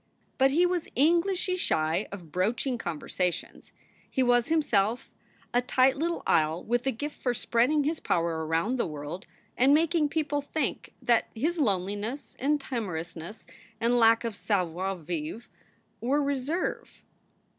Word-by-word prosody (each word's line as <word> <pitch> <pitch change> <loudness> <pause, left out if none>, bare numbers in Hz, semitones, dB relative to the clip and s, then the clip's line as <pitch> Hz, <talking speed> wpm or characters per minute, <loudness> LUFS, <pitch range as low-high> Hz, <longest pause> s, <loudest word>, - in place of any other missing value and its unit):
But 270 +1 +6
he 330 +6 +3
was 355 -2 -1
Englishly 345 +6 +2
shy 160 - 0
of 175 -6 -9
broaching 230 - 0
conversations; 175 0 -3 0.4
he 260 - +1
was 245 -1 +3
himself 240 -8 +1 0.4
a 245 - +4
tight 255 +1 +3
little 335 +4 -2
isle 155 +2 +2
with 240 +3 0
a - - +3
gift 290 +6 -6
for 245 -2 0
spreading 250 +7 +2
his 310 +2 -1
power 165 -1 0
around 165 +11 0
the - - +1
world 150 +4 -6 0.3
and 270 +3 +5
making 320 -1 +2
people 295 -2 -1
think 300 +2 -3
that 235 -2 +3
his 320 +9 -1
loneliness 205 +2 -1
and 290 +3 +2
timorousness 180 - -5 0.3
and 240 +2 +3
lack 230 0 +5
of 230 -3 -3
savoir 190 -2 -1
vivre 170 +6 -5 0.5
were 280 +5 +1
reserve. 285 +5 -2
240 Hz, 140 wpm, -28 LUFS, 185-290 Hz, 0.5 s, But